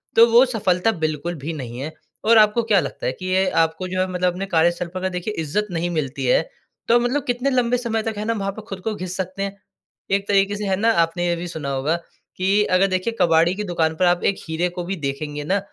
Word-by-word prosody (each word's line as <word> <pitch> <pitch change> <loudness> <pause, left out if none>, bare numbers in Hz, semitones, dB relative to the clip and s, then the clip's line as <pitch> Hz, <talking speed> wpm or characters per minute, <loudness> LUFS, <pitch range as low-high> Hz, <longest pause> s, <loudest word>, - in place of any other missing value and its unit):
तो 230 - +9
वो 240 +3 +8
सफलता 215 -4 +1
बिल्कुल 155 +3 -1
भी 155 +3 -5
नहीं 125 -5 -6
है। 145 +4 -4 0.3
और 230 +1 +6
आपको 215 +2 +5
क्या 200 - +5
लगता - - -5
है 125 - +1
कि 185 - -6
ये 185 +1 +2
आपको 165 +3 -1
जो 185 0 -3
है 185 - +1
मतलब 180 0 +1
अपने 190 +2 -4
कार्यस्थल 170 0 +1
पर 185 - -3
अगर 190 0 -1
देखिए 180 +4 -4
इज़्ज़त 210 +8 -1
नहीं 170 +1 -1
मिलती 150 -5 -2
है - - +4 0.5
तो 235 +1 +5
मतलब 250 +3 0
कितने 245 +3 0
लंबे 250 -1 +2
समय 225 -2 -2
तक 225 0 -3
है 210 - -3
ना, 230 - +1
वहाँ 195 -2 -2
पे 215 +2 -9
खुद 195 - -6
को 220 - 0
घिस 185 -1 -5
सकते 190 +1 -3
हैं, 200 0 -4 0.6
एक 200 0 +1
तरीके 200 0 +2
से 210 - -4
है 190 - +2
ना। 225 +4 +3
आपने 175 +2 -2
ये 175 - +1
भी 175 +1 -5
सुना 155 -5 -5
होगा 140 +5 0 0.4
कि 195 +3 +3
अगर 195 +1 +4
देखिए 185 +4 -1
कबाड़ी 170 +1 +4
की 210 - -3
दुकान 165 -4 0
पर 185 - +4
आप 175 0 +2
एक 200 - +2
हीरे 165 +3 0
को 175 - -3
भी 190 +3 -3
देखेंगे 145 +1 -4
ना 195 +6 +1
185 Hz, 250 wpm, -22 LUFS, 170-210 Hz, 0.6 s, तो